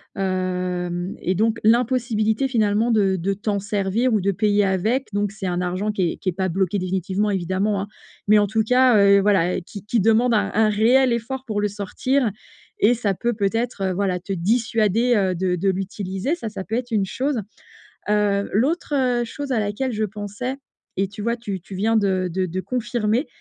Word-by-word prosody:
Hem 180 -2 -2
et 185 - -1
donc 220 +4 +1
l'impossibilité 230 0 +2
finalement 220 -2 +1
de 195 -4 +2
de 190 +3 -1
t'en 205 +1 -2
servir 205 +4 0
ou 215 - +2
de 200 +2 +1
payer 205 +1 +2
avec. 215 +8 0
Donc 205 0 -1
c'est 200 -3 -5
un 175 -1 -1
argent 185 +4 -1
qui 185 -5 0
est - - -12
qui 185 - -2
est - - 0
pas 185 +2 -2
bloqué 190 +2 0
définitivement 190 +3 -1
évidemment, 190 +2 0
hein. 205 - -5 0.4
Mais 210 0 +7
en 205 - +2
tout 220 +2 +1
cas, 250 +1 +4
heu, 200 0 +6
voilà 195 -3 +2
qui 185 +2 -10
qui 230 +2 +1
demande 225 +4 +3
un 215 - +2
un 220 0 +3
réel 240 +5 +4
effort 245 +3 -3
pour 215 -5 -3
le 210 - +1
sortir 210 +5 -1 0.5
et 225 +4 +5
ça 210 -5 -1
peut, 240 +5 -1
peut-être, 225 +1 -1
heu, 190 - 0
voilà 185 -1 -1
te 195 +3 -8
dissuader 225 +4 +1
heu, 190 -3 +2
de 180 +1 0
de 190 +3 0
l'utiliser 195 - -2
ça 345 - -6
ça 200 -2 -6
peut 220 - -4
être 245 0 -3
une 210 -3 +1
chose, 265 +2 -1 0.7
heu, 205 -1 +2
l'autre, 290 - 0
heu, 250 -3 +1
chose 285 +4 -6
à 245 - +2
laquelle 210 +5 -2
je 215 -1 -2
pensais 210 +5 -5 0.4
et 195 +1 +1
tu 205 +2 -9
vois 235 +1 0
tu 205 -5 -5
tu 180 - -12
viens 215 +4 +1
de 190 -3 +1
de 185 +1 0
de 180 +1 -4
confirmer, 235 - -1
205 Hz, 200 wpm, -22 LUFS, 190-230 Hz, 0.7 s, Mais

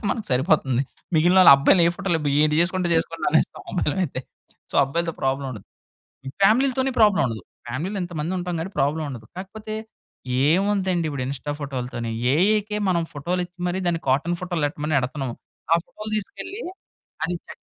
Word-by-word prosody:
ఉంటే - - -20
మనకు 220 - -3
సరిపోతుంది. 130 -2 +2 0.3
మిగిలినాళ్ళు 175 +2 +7
అబ్బాయిని 165 +6 +4
ఏ - - +2
ఫోటోలు 190 -4 0 0.2
ఏంటి 150 0 +3
జేసుకుంటే 180 +1 +1
జేసుకోండి 165 0 -1
అనేస్తాం 160 - +1
అబ్బాయిలైతే. 175 -5 -1 0.5
సో, - - -10
అబ్బాయిలతో 165 +5 -2
ప్రాబ్లమ్ 135 +1 0
ఉండదు. 110 -6 -9 0.6
ఈ - - -2
ఫ్యామిలీలతోని 260 +5 +3
ప్రాబ్లమ్ 210 -3 +5
ఉండదు. 115 -2 -5 0.2
ఫ్యామిలీలో 160 - -3
ఇంతమంది 170 0 -3
ఉంటాం 180 0 -3
కాబట్టి 185 +4 -5
ప్రాబ్లమ్ 150 +3 +1
ఉండదు. 120 -5 -8
కాకపోతే 215 +3 -6 0.7
ఏముందండి 190 -1 +1
ఇప్పుడు 140 -3 -3
ఇన్‌స్టా 140 +2 -4
ఫోటోలతోని? 125 -4 -4 0.2
ఏఐకే 210 +5 +2
మనం 170 -2 +2
ఫోటోలు 170 +5 -2
ఇచ్చి 175 +1 -25
మరి 180 +1 -1
దాన్ని 165 -1 0
కాటన్ 160 +6 +1
ఫోటోలెట్టమని 155 -4 -1
ఎడతున్నాం. 130 0 -3 0.4
ఆ - - +7
ఫోటోలు 215 0 -8
తీసుకెళ్ళి 375 - -6 0.6
అది 175 +2 -2
చెక్ - - -12
170 Hz, 150 wpm, -23 LUFS, 140-190 Hz, 0.7 s, మిగిలినాళ్ళు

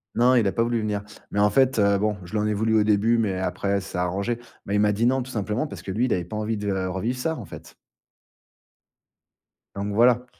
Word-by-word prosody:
Non 125 +2 +4
il 120 -4 +3
a - - +1
pas 115 - +1
voulu 120 0 0
venir. 105 -1 -2 0.3
Mais 100 - -1
en 105 0 +5
fait, 130 +2 +3
heu, 100 -1 +4
bon, 105 +1 0
je 85 - -12
lui 110 - +1
en 105 - 0
ai 105 - +1
voulu 110 +2 +1
au - - +4
début, 105 +2 +3
mais 100 -5 0
après 100 +2 -1
ça 95 - -10
s'est - - -4
arrangé. 100 +6 -1 0.3
Mais 100 - -1
il - - +3
m'a 105 0 +3
dit 105 +3 0
non, 130 0 +1
tout 130 - -10
simplement 105 +4 -2
parce - - -9
que 95 - -6
lui 115 +6 +1
il 125 - +1
avait 90 - -1
pas 100 - -7
envie 110 +1 -2
de 105 0 -2 0.2
revivre 105 +7 -2
ça, 160 +5 -1
en 115 - -7
fait - - -12 2.0
donc 100 +1 -3
voilà, 120 +3 +4
105 Hz, 255 wpm, -24 LUFS, 100-120 Hz, 2.0 s, en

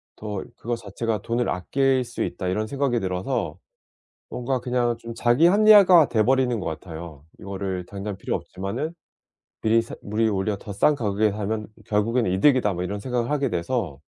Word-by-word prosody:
더 105 -2 -5
그거 120 0 -2
자체가 110 0 -3
'돈을 120 +1 0
아낄 130 +8 +1
수 120 0 -4
있다.' 95 - -4
이런 105 +4 -1
생각이 135 -2 0
들어서 95 +5 -2 0.7
뭔가 125 +1 -2
그냥 125 -1 0
좀 115 0 -8
자기 120 +8 +4
합리화가 195 -5 +7
돼버리는 125 +2 +2
것 - - -5
같아요. 80 -2 -7
이거를 95 -2 -4
당장 100 +1 -6
필요 - - -2
없지만은 115 - -4 0.7
미리 115 +1 +3
사 115 - -9
'물이 110 +2 0
오히려 100 +1 -1
더 100 +1 -8
싼 100 +10 +3
가격에 105 -4 +1
사면 105 +1 -3 0.2
결국엔 115 +3 +1
이득이다.' 105 +4 +3
뭐 90 -1 -3
이런 100 +3 -3
생각을 120 +2 -2
하게 140 -2 +1
돼서 85 - -2
110 Hz, 350 characters per minute, -24 LUFS, 100-125 Hz, 0.7 s, 합리화가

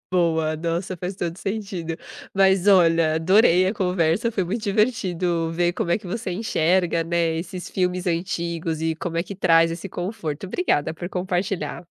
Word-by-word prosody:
Boa, 160 -3 +1
nossa, 170 +3 -3
faz 180 +3 -4
todo 170 -3 -3
o - - -15
sentido. 195 -6 -4 0.4
Mas 190 0 +3
olha, 165 -5 +5
adorei 185 +2 +4
a 200 - 0
conversa, 180 +3 +1
foi 190 -4 0
muito 215 +5 -3
divertido 185 -6 0
ver 175 +1 +1
como 170 - -3
é 175 - +3
que 200 - -12
você 195 +1 -4
enxerga, 175 -4 +1
né, 165 -1 0
esses 180 +2 -6
filmes 180 0 -1
antigos 170 -2 -2
e 160 0 0
como 165 0 -4
é - - +2
que 195 +2 -8
traz 165 -3 +4
esse 170 +4 -5
conforto. 175 -4 -4
Obrigada 160 - 0
por 175 +2 -6
compartilhar. 185 0 -2
175 Hz, 170 wpm, -23 LUFS, 165-190 Hz, 0.4 s, olha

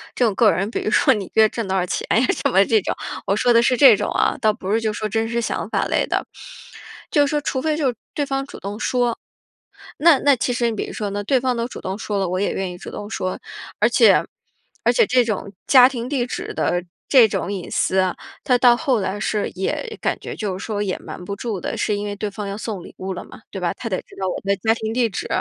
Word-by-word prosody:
这 250 - +2
种 220 - +1
个 215 +2 +4
人 200 +4 -1
比 - - -2
如 - - -1
说 - - +4
你 205 -3 -3
一 - - -13
个 220 - +2
月 220 - +6
挣 230 -4 -4
多 190 - -1
少 180 - +1
钱 - - -3
呀 245 - +4 0.2
什 - - +5
么 195 +2 +5
这 220 +1 +3
种， - - -2 0.3
我 195 - +2
说 245 - +2
的 235 0 +6
是 250 +2 +3
这 245 -4 +7
种 - - -2
啊 - - +1
倒 215 -3 +3
不 190 -1 -5
是 225 - +3
就 220 -1 -1
说 215 - -3
真 225 +2 0
实 235 +1 -1
想 225 - -3
法 - - 0
类 - - 0
的。 - - -1 0.9
就 290 -1 +4
说 295 +1 0
除 260 -2 -2
非 310 -1 0
就 275 -5 +1 0.2
对 290 - 0
方 270 -1 -2
主 - - -10
动 205 +2 -6
说， 245 -2 0 0.8
那 320 -1 +6
那 285 -2 +4
其 245 - -1
实 240 -1 0
你 - - -4
比 - - -3
如 - - -8
说 205 -2 -3
呢， 205 - -3
那 205 - -4
对 260 +5 +2
方 255 0 0
都 235 0 -2
主 - - -9
动 190 +1 -3
说 205 - -3
了， 195 -1 0
我 185 +1 -2
也 200 - 0
愿 190 -1 -3
意 175 - -9
主 - - -8
动 205 - -7
说。 185 -4 -3 0.4
而 - - +5
且 - - +5 0.6
而 - - +4
且 470 - +4
这 255 -8 +3
种 205 -3 -4
家 255 -2 +8
庭 250 -1 -5
地 265 -4 0
址 250 - -5
的 175 0 0 0.2
这 255 -5 +7
种 195 -1 -3
隐 185 -3 -6
私 190 - +1
啊， 185 -1 +1 0.3
它 250 - +3
到 245 -1 +6
后 255 -3 +1
来 190 +2 -3
是 210 0 -1
也 440 - -3
感 - - -1
觉 - - -7
就 200 -4 -3
是 195 - -7
说 210 -2 -2
也 195 -3 -1
瞒 180 - -9
不 200 +2 -5
住 210 -5 -4
的， - - -4
是 210 - 0
因 205 0 -3
为 205 - -4
对 205 0 -4
方 200 0 -6
要 200 - -4
送 210 -4 -5
礼 - - -13
物 190 0 -4
了 180 - -7
嘛， - - -14
对 190 - -6
吧？ 175 - 0
他 230 - -6
得 185 -4 -2
知 - - -18
道 190 - -1
我 - - -3
的 200 0 +1
家 220 +4 +2
庭 220 -1 -4
地 240 0 +2
址， 205 - -5
220 Hz, 300 characters per minute, -21 LUFS, 195-245 Hz, 0.9 s, 家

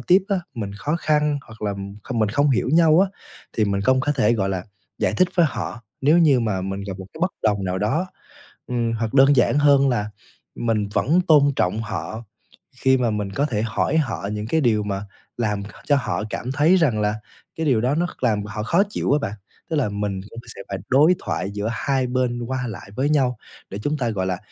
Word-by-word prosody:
tiếp 185 +2 +4
á, 200 - +2 0.2
mình 105 -4 -4
khó 145 +10 -2
khăn 150 -2 +1
hoặc 110 -1 -13
là, 105 - 0
ừm, 100 0 -6 0.2
kh - - -1
mình 110 -2 +2
không 145 +6 +2
hiểu 125 -1 +1
nhau 165 0 +6
á, 195 - +3 0.4
thì 110 - +1
mình 100 -1 0
công 130 +4 +3
có 145 +2 0
thể, 125 -5 +2
gọi 100 -4 0
là, 95 -2 -3 0.3
giải - - +1
thích 185 -1 +3
với 175 -3 +5
họ, 115 - -5 0.2
nếu 150 +5 +4
như 145 -7 +5
mà 105 -5 -1
mình 95 +1 -4
gặp 95 -1 -6
một 95 - -8
cái - - -12
bất 185 +1 +1
đồng 100 -3 +1
nào 90 0 -1
đó. 115 - 0 0.6
Ừm, 120 -2 -1
hoặc 115 -1 -2
đơn 135 +1 +6
giản 130 +3 +3
hơn 140 -2 +5
là 105 -4 -1 0.5
mình 110 -3 0
vẫn 165 +11 +3
tôn 150 -3 +6
trọng 95 +2 0
họ 115 +1 -5 0.5
khi 130 0 +3
mà 120 -3 +1
mình 105 -2 -3
có 140 +8 0
thể 110 -8 -1
hỏi 115 +7 0
họ 120 -9 -1
những 105 0 -4
cái 160 +6 +1
điều 110 -4 +2
mà 100 0 -3 0.3
làm 105 -3 -1
h - - -8 0.2
cho 145 - +4
họ 130 -5 -1
cảm 125 - -4
thấy 150 +6 +4
rằng 130 -12 +2
là 105 0 +1 0.4
cái 160 - -1
điều 125 -7 +3
đó 130 +4 +1
nó 170 +3 +1
kh 145 - -13
làm 105 -4 +2
họ 105 +1 -5
khó 170 - +3
chịu 205 - -1
á 145 - +4
bạn. 105 -8 -3 0.4
Tức 160 - -1
là 130 -7 +1
mình 100 -1 -3
cũng 115 - -9 0.2
sẽ 100 - -8
phải 100 - -3
đối 150 +7 +5
thoại 95 +2 -3
giữa 105 +2 -3
2 130 +2 0
bên 125 -1 -1
qua 130 -1 -2
lại 100 -3 -8
với 135 +4 0
nhau 130 -6 +2 0.3
để 100 - -6
chúng 150 +1 0
ta, 125 -4 -1
gọi 95 -4 -2
là, 90 -1 -1
120 Hz, 235 wpm, -22 LUFS, 105-145 Hz, 0.6 s, nhau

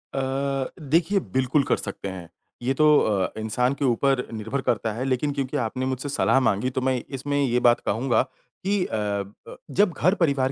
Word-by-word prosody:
अ, - - 0 0.6
देखिए 165 +7 +2
बिल्कुल 130 +2 +2
कर - - +1
सकते - - -6
हैं, 90 -3 -8 0.3
ये 125 +2 0
तो 155 +3 +3
अ, 100 -4 +1
इंसान 125 +4 0
के 140 0 -2
ऊपर 130 +1 +2
निर्भर 110 +5 -3
करता 115 -3 0
है 120 +4 -3
लेकिन 135 +2 0
क्योंकि 135 -2 -2
आपने 125 +2 -2
मुझसे 130 +2 -3
सलाह 135 -1 +3
माँगी 115 0 +1
तो 130 0 -3
मैं 130 -2 0
इसमें 145 +1 -2
ये 125 -2 +2
बात 120 -1 +4
कहूँगा 120 +2 +2 0.4
कि 195 -1 +1
अ, - - -7
ब 100 -1 -4 0.2
जब 200 -2 +4
घर-परिवार 140 -7 +2
130 Hz, 185 wpm, -24 LUFS, 115-140 Hz, 0.6 s, बात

